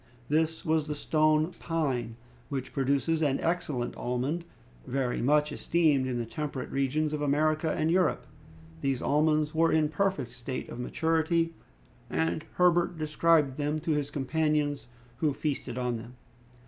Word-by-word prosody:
This 160 +2 +1
was 160 -1 +1
the 150 - -2
stone 155 +2 +2
pine, 135 -9 -1 0.3
which 135 -2 -4
produces 140 +4 +1
an 140 -3 +2
excellent 165 -8 -1
almond, 130 +8 -2 0.4
very 130 -2 -1
much 150 +3 +3
esteemed 150 -4 +2
in 125 -1 -2
the 120 - -2
temperate 145 +1 -5
regions 145 +3 0
of 150 - -2
America 155 +2 +2
and 160 +1 +1
Europe. 180 +1 +2 0.6
These 135 -2 -1
almonds 150 +1 +2
were 165 +1 +3
in 160 -1 +3
a - - -1
perfect 185 -6 -1
state 125 +1 -6
of 120 - -7
maturity, 165 +4 +1 0.6
and 80 +1 0
Herbert 175 -1 +3
described 155 -2 +2
them 150 +1 -1
to 165 - -1
his 145 -2 0
companions, 145 0 0 0.3
who 150 +1 +1
feasted 135 -4 -3
on 125 -2 -1
them. 115 +2 -10
150 Hz, 150 wpm, -29 LUFS, 135-160 Hz, 0.6 s, much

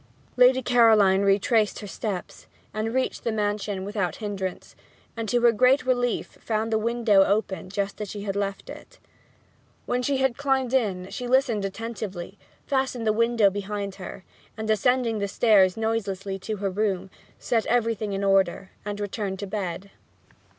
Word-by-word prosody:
Lady 255 +1 +5
Caroline 220 -6 +5
retraced 205 +2 +2
her 210 - -7
steps, 200 -1 -5 0.3
and 215 +1 -2
reached 260 +2 -1
the 230 - 0
mansion 205 -2 -2
without 200 -3 -2
hindrance; 195 -4 -5 0.4
and 225 -2 -4
to 245 - +2
her 240 0 +6
great 255 +4 +3
relief 245 -2 -1
found 220 0 -1
the 220 - +2
window 225 -3 +3
open 200 -2 -1
just 200 +1 -3
as 210 - -4
she 205 0 -6
had 200 -1 -3
left 200 -1 -3
it. - - -11 0.9
When 245 0 0
she 275 +2 0
had 265 -2 +1
climbed 265 -3 0
in 195 -8 0
she 250 - -5
listened 245 -5 +2
attentively, 200 -3 -6 0.3
fastened 265 -4 -1
the 215 - +3
window 230 -2 +3
behind 200 0 -4
her, 185 - -8 0.3
and 220 0 -4
ascending 235 0 +2
the 200 - -1
stairs 195 -3 +4
noiselessly 200 -3 -2
to 215 +3 -4
her 200 -1 -2
room, 195 -2 -1 0.3
set 230 -3 0
everything 225 -3 0
in 195 +1 -2
order, 195 -1 +2
and 205 0 -5
returned 205 -1 -3
to 200 - -5
bed. 195 -1 -4
215 Hz, 160 wpm, -25 LUFS, 195-235 Hz, 0.9 s, her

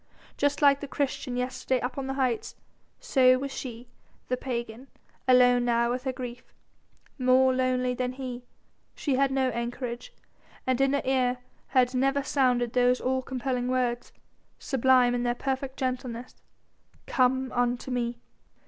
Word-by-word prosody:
Just 285 +1 0
like 280 -1 +6
the 285 - -5
Christian 270 -2 -2
yesterday 255 +1 -1
up 250 +1 -4
on 275 -1 -4
the 270 - -3
heights, 255 -4 -1 0.4
so 260 - +4
was 275 +1 -4
she 245 -2 -7 0.4
the 255 - +2
pagan 240 -1 -5 0.4
alone 245 -1 +5
now 235 0 +2
with 250 +2 -3
her 260 - 0
grief. 250 -1 -8 0.6
More 255 +1 +4
lonely 255 -1 +1
than 250 0 -2
he 255 -2 -6 0.5
she 285 - -1
had 275 +1 +3
no 265 -1 +1
anchorage, 240 0 -4 0.5
and 255 0 +1
in 270 0 +3
her 280 - 0
ear 255 -1 +1 0.3
had 255 -1 +2
never 275 +2 +1
sounded 250 -4 +1
those 250 0 +3
all 260 +1 0
compelling 255 -1 -2
words, 245 -1 -1 0.5
sublime 255 -2 +3
in 245 - 0
their 240 0 0
perfect 265 +1 -3
gentleness: 250 -2 -4 0.6
"Come 260 0 +1
unto 245 +1 -1
Me!" 240 -1 -1
255 Hz, 150 wpm, -27 LUFS, 245-265 Hz, 0.6 s, like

